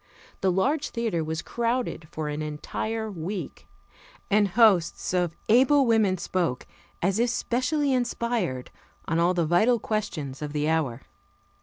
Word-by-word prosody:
The 190 - +2
large 280 - +1
theater 225 -9 -1
was 160 +1 -3
crowded 235 -8 -2
for 155 -1 -4
an 150 +1 -3
entire 215 +9 -4
week, 175 -2 -6 0.6
and 205 0 +4
hosts 195 -5 +3
of 175 -2 0
able 265 +5 +5
women 220 -5 +3
spoke, 175 -6 -2 0.4
as 190 +4 +1
if 240 +1 +3
specially 270 +4 0
inspired, 235 - -1 0.4
on 165 0 +1
all 175 +2 +3
the 170 -2 +1
vital 215 +10 +3
questions 160 -12 -3
of 150 -1 -4
the 150 0 0
hour. 150 -6 0
190 Hz, 140 wpm, -26 LUFS, 160-235 Hz, 0.6 s, able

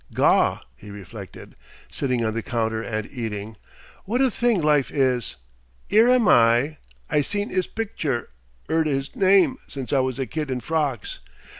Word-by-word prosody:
"Gaw!" - - +3 0.2
he 105 +11 -13
reflected, 100 -3 -10 0.4
sitting 125 -4 -1
on 110 - -1
the 115 - -2
counter 110 -1 -2
and 110 -2 -4
eating, 110 -3 -5 0.5
"what 235 +6 -1
a 265 -2 +3
thing 235 -2 +1
life 150 -3 +2
is! 130 -5 0 0.6
'Ere 225 +3 +6
am 250 -4 +4
I; 120 +4 +4 0.3
I 150 -2 +2
seen 205 +7 -2
'is 185 -1 0
picture, 160 - -3 0.4
'eard 160 0 +1
'is 135 -1 -2
name 195 +6 +4
since 135 0 -6
I 140 - +4
was 130 -1 -1
a 135 - -1
kid 150 +1 -4
in 130 -1 -2
frocks. 145 -6 -2
135 Hz, 160 wpm, -23 LUFS, 115-180 Hz, 0.6 s, Ere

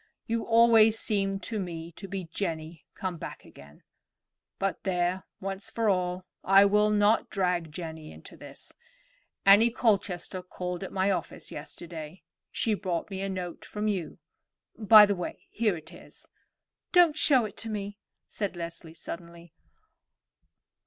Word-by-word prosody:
You 230 0 -2
always 225 -1 +6
seemed 195 -3 -1
to 220 - -2
me 170 -3 -5
to 195 +4 -10
be 195 0 -4
Jenny 165 -2 -5
come 185 -3 -4
back - - -8
again; 70 +1 -16 0.7
but 195 -1 -2
there, 180 -1 -1
once 195 +1 -5
for 225 -2 0
all, 180 -1 0 0.2
I 195 +1 +6
will 210 +1 +4
not 210 +1 +3
drag 180 -4 -1
Jenny 160 -1 -7
into - - -13
this. - - -12 0.7
Annie 205 +4 +7
Colchester 195 -6 0
called 180 0 -5
at 190 - -6
my 190 +1 +1
office 190 - -4
yesterday; 165 0 -8 0.3
she 225 - 0
brought 185 -2 -3
me 190 0 -4
a 195 - -2
note 180 -2 -5
from 210 0 -4
you. 185 -7 -2 0.6
By 215 -1 +8
the 205 - +1
way, 180 - -6
here 210 -5 +1
it 160 0 -13
is." - - -13 0.6
"Don't 350 -5 +5
show 275 -5 +4
it 205 - -8
to 225 - -5
me," 205 -1 -5 0.3
said 200 -3 -4
Leslie 170 -1 -7
suddenly. 170 -1 -9
190 Hz, 145 wpm, -28 LUFS, 175-210 Hz, 0.7 s, By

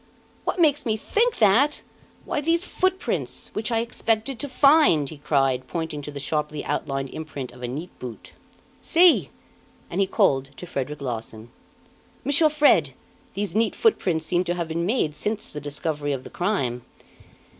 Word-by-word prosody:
"What - - -1
makes 295 -3 +4
me 220 -4 0
think 455 - +1
that? 235 +8 +3 0.4
Why 295 - -1
these 335 +3 +2
footprints, 375 -1 -2
which 215 +3 -2
I 225 -1 +2
expected 230 +1 -1
to 285 - -3
find!" 275 - +5
he 155 - -10
cried, 135 -3 +1
pointing 160 -3 -4
to 145 - -7
the 145 -1 -6
sharply 150 +1 -2
outlined 135 -2 -2
imprint 145 -5 -6
of 125 0 -14
a 125 - -3
neat 150 +8 -6
boot. 120 -3 -9 0.5
"See!" 345 0 +5 0.6
and - - 0
he 195 - +2
called 135 -7 +2
to - - -7
Frederic 145 -2 -4
Larsan. 115 -2 -6 0.7
"Monsieur 290 +2 +4
Fred, 230 - +3 0.4
these 205 +1 -2
neat 220 +1 +1
footprints 180 - +1
seem 175 +2 +1
to 175 - -1
have 170 -2 -3
been 170 +2 -1
made 200 - 0
since 210 +7 -2
the 150 - -7
discovery 145 0 -2
of 130 -2 -4
the - - -11
crime." 135 - -1
170 Hz, 165 wpm, -24 LUFS, -, 0.7 s, find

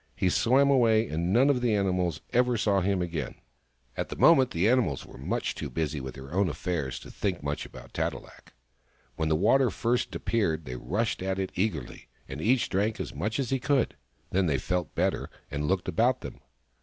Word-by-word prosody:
He 90 - +1
swam 135 +7 +4
away, 115 -4 +4
and 85 +3 -1
none 125 +6 +5
of 125 -3 0
the 120 -3 +2
animals 90 -5 0
ever 125 0 +3
saw 100 -3 +2
him 95 -1 +1
again. 80 -6 -4 0.6
At - - -3
that - - -6
moment 135 -6 +6
the 90 +1 +1
animals 115 - +2
were - - -13
much - - -2
too 70 - -5
busy 75 +1 -2
with 65 -1 -7
their 70 +3 -10
own 95 0 +2
affairs 75 -4 -3
to - - -11
think 90 -6 -2
much 70 +1 -3
about - - -13
Tat - - 0
e - - -6
lak. - - -16 0.6
When 80 +1 -1
the 80 - +3
water 130 +10 +4
first 120 +2 -1
appeared 80 -9 0
they 60 - -5
rushed 100 - -2
at 95 0 -1
it 95 -1 -2
eagerly, 90 - -3 0.2
and 65 +3 -6
each 120 +6 +2
drank 105 +3 0
as - - -4
much 110 +2 -2
as 135 -2 -2
he 135 - +1
could. 140 0 +1 0.4
Then 95 -1 +2
they 70 -3 +2
felt 90 -3 -2
better, - - 0 0.2
and 75 +1 -2
looked 95 0 0
about 120 +9 +2
them. - - -8
95 Hz, 205 wpm, -28 LUFS, 80-115 Hz, 0.6 s, moment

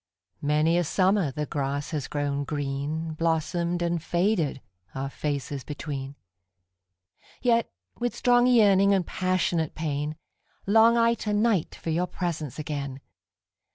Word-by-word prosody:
Many 150 +4 +2
a - - +2
summer 190 0 +2
the 150 +3 -3
grass 140 0 -3
has 150 -4 -3
grown 145 -1 -1
green, 145 +3 -3
Blossomed 170 +2 0
and 170 -1 0
faded, 175 -4 0 0.4
our 135 +1 -3
faces 140 -2 -3
between:Yet, 95 - -5 0.3
with 245 0 -1
strong 245 0 +4
yearning 200 -5 +5
and 185 -3 0
passionate 180 -4 0
pain, 150 -1 -2 0.5
Long 225 +3 +5
I 230 0 +4
to 210 - -1
night 205 -5 +1
for 165 - -4
your 175 +3 0
presence 160 -8 -4
again. 140 -3 -4
155 Hz, 120 wpm, -26 LUFS, 140-185 Hz, 0.5 s, yearning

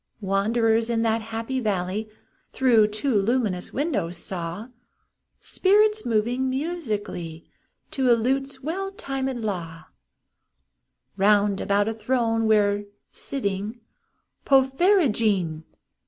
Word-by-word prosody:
Wanderers 225 +3 +1
in 230 -1 +1
that 225 0 +1
happy 225 +4 -4
valley, 205 -1 -2 0.4
Through 235 -5 +4
two 215 +6 -2
luminous 210 -3 0
windows, 255 - -1
saw 175 +5 -5 0.7
Spirits 425 - +2
moving 240 +4 0
musically, 215 - -4 0.5
To 265 -2 +1
a 235 - +5
lute's 265 +3 -2
well 385 +6 -3
tunëd 265 - -4
law, 165 -6 -4 1.3
Bound 200 0 +3
about 205 +1 +1
a 225 - -1
throne 225 0 0
where, 205 -1 +2 0.3
sitting 210 -3 -4 0.6
(Porphyrogene!) 260 - +2
225 Hz, 95 wpm, -24 LUFS, 200-265 Hz, 1.3 s, a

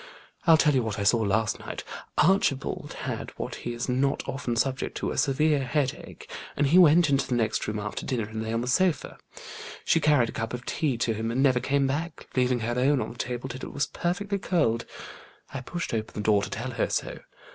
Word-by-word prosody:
I'll 165 -1 +8
tell 150 -1 +4
you 130 - +3
what 110 -3 -3
I 100 - -1
saw 115 +4 +4
last 110 +1 +1
night. - - -6 0.3
Archibald 160 -6 +1
had - - -4
what - - -4
he 120 - -5
is 120 0 -4
not 135 +2 0
often 125 -3 -2
subject 130 +2 -1
to, - - -2
a - - -4
severe 145 +1 +2
headache, 140 0 -3 0.3
and 145 - +3
he 165 +7 +5
went 170 -1 +7
into 140 0 +2
the 125 - 0
next 110 -2 0
room 105 0 -2
after 105 0 -4
dinner, 115 -5 -2
and 110 0 -5
lay 110 0 -3
on 115 +1 0
the 125 - -4
sofa. 180 +6 +1 0.7
She 165 - +4
carried 145 -7 +3
a - - -4
cup 115 +2 -3
of 125 0 -9
tea 140 -6 -1
to 115 -1 0
him, 110 +1 -3
and 125 +4 +1
never 130 -3 +4
came 140 +2 +1
back, 155 +6 -3
leaving 125 -1 +2
her 120 +2 -1
own 135 +2 +3
on 110 - -3
the 120 - -12
table 125 +1 -3
till 130 0 -6
it - - -12
was 145 - +1
perfectly 200 +3 -2
cold. 115 -13 +1 0.7
I 135 - -4
pushed 175 +4 -4
open 110 -1 -3
the 105 - -4
door 105 -2 +4
to - - -4
tell 125 +5 -4
her - - -1
so. - - -2
130 Hz, 225 wpm, -27 LUFS, 115-145 Hz, 0.7 s, I'll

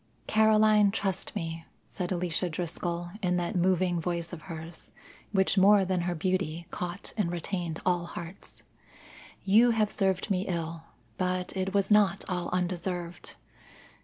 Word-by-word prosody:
"Caroline, 215 -1 +5
trust 195 -2 -2
me," 165 0 -4 0.2
said 180 -1 -5
Alicia 180 0 -1
Driscoll 175 +1 -3
in 180 -2 +1
that 175 +1 -2
moving 180 -1 +2
voice 170 0 -2
of 165 - -7
hers, 160 0 -8 0.4
which 190 -1 +3
more 200 0 +6
than 185 -1 0
her 175 0 -1
beauty 170 -1 -1
caught 180 +2 -5
and 190 -5 +1
retained 175 -2 -3
all 175 -1 +1
hearts. 175 +3 -9 0.8
"You 220 +5 +6
have 215 -1 +2
served 190 0 0
me 190 0 0
ill, 165 -2 -3 0.3
but 185 0 -1
it 190 +1 -2
was 200 0 +2
not 200 -2 +4
all 180 -3 -2
undeserved. 180 -1 -3
180 Hz, 140 wpm, -29 LUFS, 170-195 Hz, 0.8 s, more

